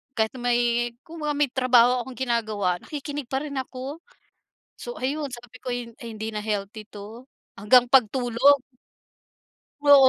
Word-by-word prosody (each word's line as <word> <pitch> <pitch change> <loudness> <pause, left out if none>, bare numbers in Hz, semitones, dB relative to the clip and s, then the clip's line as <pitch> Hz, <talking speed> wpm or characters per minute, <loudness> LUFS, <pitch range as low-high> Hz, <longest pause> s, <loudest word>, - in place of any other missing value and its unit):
Kahit 220 -1 +2
na - - -8
may 240 0 +1
kumbaga 310 -2 -3
may 290 -3 +2
trabaho 250 -1 +4
akong 255 -3 -10
ginagawa, 215 -7 0
nakikinig 290 -1 -5
pa 265 +1 -1
rin 280 -2 -5
ako. 260 +3 -5 0.8
So 485 - -7
ayun, 285 +2 -2
sabi 240 0 -10
ko 250 - -3
ay 235 -1 -5
ay 235 - -6
hindi 220 +1 -5
na 210 0 -3
healthy 210 0 -3
'to. 215 +4 -10 0.3
Hanggang 245 +5 +5
pagtulog. 255 +2 +4 1.2
Oo. 280 -2 +8
245 Hz, 150 wpm, -25 LUFS, 225-270 Hz, 1.2 s, Oo